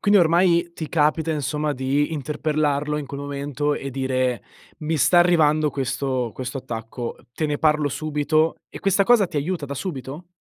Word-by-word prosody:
Quindi 205 -2 +5
ormai 170 0 +3
ti 160 - -5
capita 160 +1 +1
insomma 150 0 -1
di 140 +4 0
interpellarlo 150 0 -1
in 145 - -5
quel 140 +1 -6
momento 145 +1 -2
e 135 - -5
dire: 130 -2 -1 0.4
“Mi 160 +1 -1
sta 175 +6 +5
arrivando 155 -4 +4
questo 130 -2 -2
questo 130 +1 -5
attacco, 115 0 -6 0.2
te 155 +5 -1
ne 150 - -1
parlo 150 -1 +2
subito.” 155 +3 0
e - - -10
questa 195 0 +3
cosa 225 -3 +5
ti 160 - -7
aiuta 160 +2 -2
da 140 - -5
subito? 145 0 -6
150 Hz, 165 wpm, -23 LUFS, 140-160 Hz, 0.4 s, Quindi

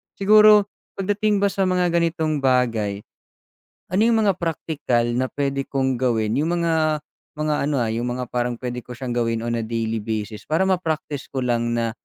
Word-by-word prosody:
siguro, 210 0 +6 0.3
pagdating 205 +1 0
ba 200 - +3
sa 190 -1 0
mga 180 -1 +1
ganitong 165 -3 0
bagay, 115 -6 +1 0.9
ano 185 - +1
yung 225 -1 +3
mga 195 -3 +2
praktikal 155 -7 -1 0.2
na 130 - +1
puwede 140 -1 -2
kong 130 -2 -1
gawin, 115 -3 0
yung 170 +3 0
mga 155 -2 +1 0.3
mga 150 0 -1
ano, 140 -4 +1
ah, 115 - -1
yung 115 +2 -2
mga 125 -1 -5
parang 120 0 -1
puwede 125 0 -4
ko 125 - -8
siyang 125 0 -5
gawin 115 -1 0
on 120 0 -1
a 115 - -3
daily 115 0 -2
basis 110 0 -5
para 160 +4 +1
ma-practice 160 -6 -2
ko 135 -2 -3
lang 120 -1 0
na 115 -1 0
135 Hz, 180 wpm, -22 LUFS, 120-170 Hz, 0.9 s, siguro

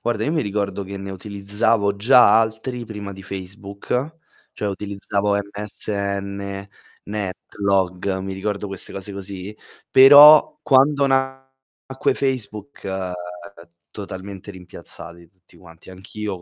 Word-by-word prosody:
Guarda, 120 -2 -1
io - - 0
mi 160 - +1
ricordo 100 -1 -3
che 100 +1 -7
ne 95 0 -7
utilizzavo 100 +2 0
già 120 +2 +6
altri 115 +2 -3
prima 105 -3 -7
di 95 0 -11
Facebook, 100 - -5 0.3
cioè 105 - -3
utilizzavo 100 +1 -2
MSN, 100 -1 -4 0.4
NetLog, 95 -2 -2
mi 95 0 -5
ricordo 100 +1 -3
queste 95 -2 -3
cose 100 +1 -6
così. 100 +1 -7 0.4
Però 145 +3 +9
quando 140 0 +4
nacque 135 0 -2
Facebook, 130 -2 -4
uhm, 90 -2 -7 0.2
totalmente 100 0 -8
rimpiazzati 85 -2 -11
tutti 90 +1 -26
quanti. 85 +1 -16
Anch'io 95 +1 -6
100 Hz, 115 wpm, -21 LUFS, 95-110 Hz, 0.4 s, Però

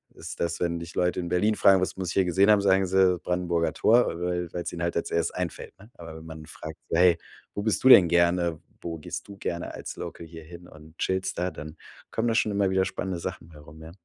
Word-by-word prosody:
ist - - -9
das, 85 0 -2
wenn 85 -1 -1
dich 85 0 -9
Leute 90 0 0
in 85 -1 -4
Berlin 105 +5 +2
fragen: 95 -1 +5
„Was 95 - -2
muss 95 -2 -3
ich - - -3
hier 95 - +2
gesehen 95 +3 +3
haben?“ 105 -1 +5
Sagen 95 -1 +3
sie: 95 -1 +3
„Brandenburger 85 -2 -1
Tor.“ 115 +8 +4
Weil 90 -1 -2
weil's 85 - -4
ihnen 85 -1 -4
halt 85 - -1
als 85 - -2
1. 85 -1 0
einfällt, 90 -3 -5
ne? 105 +3 -16
Aber 80 -1 -10
wenn 80 - -12
man 80 -1 -9
fragt 75 - -9
so: - - -1
„Hey, 90 -1 +5 0.4
wo 100 - -3
bist 110 -1 0
du 130 - +6
denn 95 -8 +9
gerne? 85 -1 +2 0.2
Wo 85 -1 -5
gehst - - -7
du 100 -1 -11
gerne 85 -2 -4
als - - -7
Local 85 - -8
hier 80 0 -11
hin 85 +2 -12
und 80 +1 -16
chillst 95 -1 -1
da?“ 90 +1 0
Dann 75 +1 -9 0.4
kommen 115 +1 -1
da 115 - +1
schon 110 - +2
immer 100 -1 +1
wieder 95 0 +2
spannende 95 -2 -4
Sachen 85 - -6
bei 80 - -15
rum, 75 +2 -14
ja. 80 +1 -10
90 Hz, 250 wpm, -26 LUFS, 85-95 Hz, 0.4 s, denn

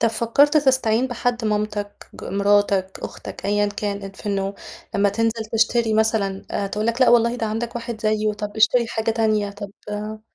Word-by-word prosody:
طَب 230 - +4
فكّرت 235 +7 +3
تستعين 260 -4 +3
بحد 245 -1 -2
مامتك، 210 -1 -2
ج - - -9
مراتك، 200 -1 +1
أختك - - -8
أيًا 205 +1 +2
كان، 200 -1 -4
في 195 - -13
إنّه 195 -1 -1 0.4
لمّا 200 0 +3
تنزل 225 +2 -1
تشتري 225 0 +2
مثلًا 215 -3 +1 0.3
تقول 210 +1 -1
لَك 230 +2 -1
لأ 255 - +6
والله 235 0 +4
ده 225 -2 -2
عندك 225 +3 -3
واحد 230 -1 -5
زيّه 215 0 +1
طَب 210 0 -6
اشتري 235 +2 +4
حاجة 225 0 -1
تانية 215 -2 +1
طَب 200 0 -8 0.2
آآ 210 +1 -5
215 Hz, 175 wpm, -22 LUFS, 205-230 Hz, 0.4 s, لأ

